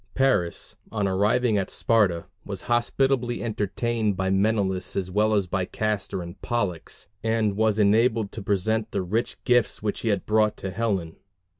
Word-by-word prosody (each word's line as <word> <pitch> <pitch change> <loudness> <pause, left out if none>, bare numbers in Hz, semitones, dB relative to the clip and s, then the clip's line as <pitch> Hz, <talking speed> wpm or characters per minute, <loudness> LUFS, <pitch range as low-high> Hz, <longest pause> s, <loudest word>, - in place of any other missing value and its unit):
Paris, 130 -11 +1 0.2
on 105 -3 0
arriving 105 +4 +2
at 95 - -3
Sparta, 100 -7 +2 0.2
was 100 -2 -5
hospitably 120 +1 +1
entertained 110 -1 -1
by 95 0 0
Menelaus 95 -2 +1
as 95 -1 -2
well 105 +2 +2
as 100 -2 +2
by 90 +1 -1
Castor 100 -1 -2
and 85 +2 -10
Pollux, 100 -9 -2 0.2
and 110 -2 +1
was 110 0 +2
enabled 110 +1 +3
to 110 - -7
present 105 +3 0
the 100 -3 -2
rich 110 +7 -1
gifts 125 -4 +2
which 105 - -1
he - - -4
had 100 -3 0
brought 105 0 +2
to 95 - -5
Helen. 95 -6 -2
105 Hz, 160 wpm, -25 LUFS, 95-115 Hz, 0.2 s, enabled